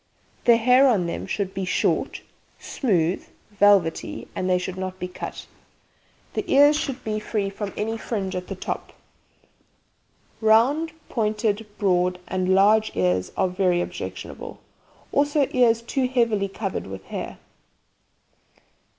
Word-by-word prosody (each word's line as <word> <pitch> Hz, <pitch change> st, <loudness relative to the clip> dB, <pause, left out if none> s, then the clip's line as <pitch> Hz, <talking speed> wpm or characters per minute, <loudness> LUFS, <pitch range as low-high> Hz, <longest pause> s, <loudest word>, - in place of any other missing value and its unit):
The 235 Hz, -1 st, +7 dB
hair 250 Hz, +4 st, +5 dB
on 210 Hz, -9 st, +2 dB
them 170 Hz, -, -4 dB
should 195 Hz, -1 st, -2 dB
be 190 Hz, -, -3 dB
short, 185 Hz, -, 0 dB, 0.4 s
smooth 180 Hz, -, 0 dB, 0.3 s
(velvety), 200 Hz, -5 st, +2 dB
and 185 Hz, -, -1 dB
they 180 Hz, -, +4 dB
should 180 Hz, 0 st, -4 dB
not 185 Hz, 0 st, -5 dB
be 180 Hz, -, -4 dB
cut. 180 Hz, -, -7 dB, 0.9 s
The -, -, -1 dB
ears 290 Hz, +2 st, +6 dB
should 270 Hz, -3 st, -3 dB
be 215 Hz, -1 st, -2 dB
free 205 Hz, -2 st, -2 dB
from 200 Hz, 0 st, -5 dB
any 225 Hz, +2 st, -2 dB
fringe 195 Hz, -6 st, -3 dB
at 180 Hz, 0 st, -4 dB
the 195 Hz, -, -5 dB
top. 185 Hz, -, -5 dB, 1.5 s
Round, 250 Hz, +9 st, +4 dB, 0.2 s
pointed, 215 Hz, -1 st, -1 dB
broad 180 Hz, -2 st, +1 dB
and 185 Hz, 0 st, +1 dB
large 215 Hz, +3 st, +4 dB
ears 90 Hz, 0 st, +1 dB
are -, -, +3 dB
very 180 Hz, -1 st, +1 dB
objectionable, -, -, -6 dB, 0.5 s
also 285 Hz, -1 st, +2 dB
ears 230 Hz, -2 st, +3 dB
too 255 Hz, +2 st, 0 dB
heavily 230 Hz, -6 st, +1 dB
covered 195 Hz, -, -4 dB
with 95 Hz, 0 st, -8 dB
hair. -, -, -6 dB
205 Hz, 135 wpm, -24 LUFS, 185-230 Hz, 1.5 s, The